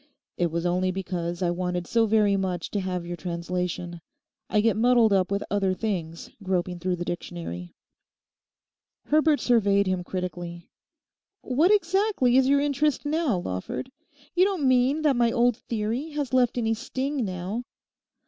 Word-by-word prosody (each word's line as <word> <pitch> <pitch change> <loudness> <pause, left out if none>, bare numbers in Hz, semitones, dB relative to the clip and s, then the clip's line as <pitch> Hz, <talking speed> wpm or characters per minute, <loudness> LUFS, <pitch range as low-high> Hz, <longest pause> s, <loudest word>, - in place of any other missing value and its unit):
'It 175 -1 0
was 170 +2 -3
only 180 +1 +1
because 175 -1 -3
I 175 - +2
wanted 180 0 -2
so 230 +3 +2
very 210 -2 +3
much 185 -3 -2
to 205 - -1
have 180 -2 -3
your 175 0 -4
translation. 175 0 -4 0.5
I 210 - +2
get 220 +1 +3
muddled 235 -1 +4
up 190 -1 +2
with 200 0 -1
other 195 -2 +1
things 175 -6 -4
groping 180 -2 -1
through 180 +1 -1
the 175 0 -5
dictionary.' 170 - -6 1.3
Herbert 305 0 +3
surveyed 200 -4 +3
him 185 -1 -1
critically. 175 -2 -6 0.7
'What 300 +9 +3
exactly 385 - +2
is 260 0 +5
your 280 0 +4
interest 290 0 0
now, 300 - +1
Lawford? 95 - -4 0.4
You 360 - +4
don't 375 -8 +1
mean 260 +4 +3
that 290 -3 +3
my 235 -1 +3
old 245 -1 +3
"theory" 230 +5 -3
has 285 -3 -3
left 250 -1 +3
any 225 -2 +1
sting 265 +4 -3
now? 190 +4 -4
200 Hz, 155 wpm, -26 LUFS, 180-255 Hz, 1.3 s, is